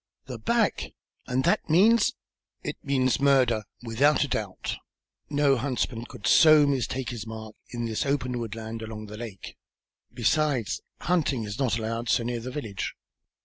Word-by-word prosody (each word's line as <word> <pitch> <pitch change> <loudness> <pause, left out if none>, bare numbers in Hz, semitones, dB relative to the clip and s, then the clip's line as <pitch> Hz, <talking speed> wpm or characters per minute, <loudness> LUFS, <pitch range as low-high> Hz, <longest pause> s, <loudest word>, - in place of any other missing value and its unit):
"The - - -7
back! - - 0 0.3
And 130 +1 0
that 170 0 +1
means 220 +9 +5 0.2
" - - -66
"It - - -3
means 130 -3 +1
murder, 130 -6 +3 0.2
without 135 +7 +3
a - - -2
doubt. 105 -7 -3 0.5
No 145 -2 +3
huntsman 125 -2 -2
could 105 - -10
so 155 +4 +7
mistake 130 -2 -1
his 115 -2 -6
mark 110 -1 -7 0.2
in 120 -1 -4
this 110 -2 -1
open 125 -3 -1
woodland, 115 0 -5
along 110 -1 -7
the 105 0 -9
lake. 110 -5 -8 0.5
Besides, 125 0 +1 0.2
hunting 155 -8 +1
is 105 +2 -6
not 125 -5 +1
allowed 115 +1 -3
so 120 - +3
near 120 0 -2
the 120 +2 -6
village. 115 -7 -4
120 Hz, 155 wpm, -27 LUFS, 110-140 Hz, 0.5 s, so